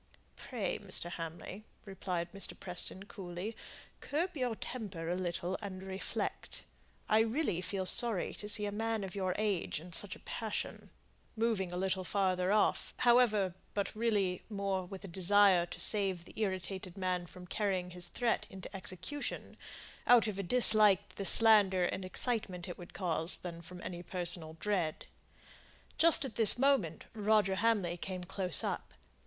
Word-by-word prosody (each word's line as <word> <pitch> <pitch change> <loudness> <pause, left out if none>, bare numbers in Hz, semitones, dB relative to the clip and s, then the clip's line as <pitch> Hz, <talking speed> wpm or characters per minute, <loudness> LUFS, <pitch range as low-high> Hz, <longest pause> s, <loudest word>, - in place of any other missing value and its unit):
"Pray, 230 -7 -4
Mr. 185 -4 -3
Hamley," 170 +4 -7 0.2
replied 185 -3 -4
Mr. 195 - -3
Preston, 185 +1 -1
coolly, 195 +1 -7 0.4
"curb 340 +5 -2
your 250 -5 -1
temper 205 -10 -6
a 175 - 0
little, 180 0 -3
and 190 -2 -7
reflect. 190 0 -5 0.4
I 215 - +4
really 225 - 0
feel 190 +1 -3
sorry 220 -1 +3
to 210 - -5
see 210 0 +4
a 205 - -3
man 220 0 -2
of 190 -2 -6
your 185 -2 -2
age 205 -7 -1
in 175 +2 -11
such 205 +3 +1
a - - -15
passion:" 220 -2 -5 0.5
moving 220 -5 0
a 180 - -4
little 190 0 -1
farther 185 0 0
off, 210 0 +1
however, 230 -6 +3 0.2
but 200 0 -2
really 205 -5 0
more 195 -3 -2
with 190 +2 -9
a - - -7
desire 190 0 +4
to - - -9
save 195 -5 +1
the - - -14
irritated 190 -2 -3
man 180 -2 -2
from 180 +2 -12
carrying 185 -2 -2
his 180 0 -4
threat 235 +5 -1
into 190 +1 -10
execution, 190 - -2 0.5
out 240 -4 +6
of 200 -2 -4
a - - +1
dislike 210 -2 +6
to - - -20
the 195 - -1
slander 205 -5 +6
and 185 +2 -3
excitement 185 -2 -2
it 175 - -6
would 175 - -12
cause, 170 -2 +1
than 170 -2 -8
from 180 +2 -10
any 175 -1 -6
personal 175 -3 -2
dread. 180 -7 -2 0.9
Just 330 -3 +6
at 235 -6 -7
this 225 0 +7
moment 245 - +1
Roger 210 -2 +2
Hamley 200 -6 +1
came 185 0 -5
close 180 0 +2
up. - - -4
195 Hz, 160 wpm, -33 LUFS, 180-215 Hz, 0.9 s, this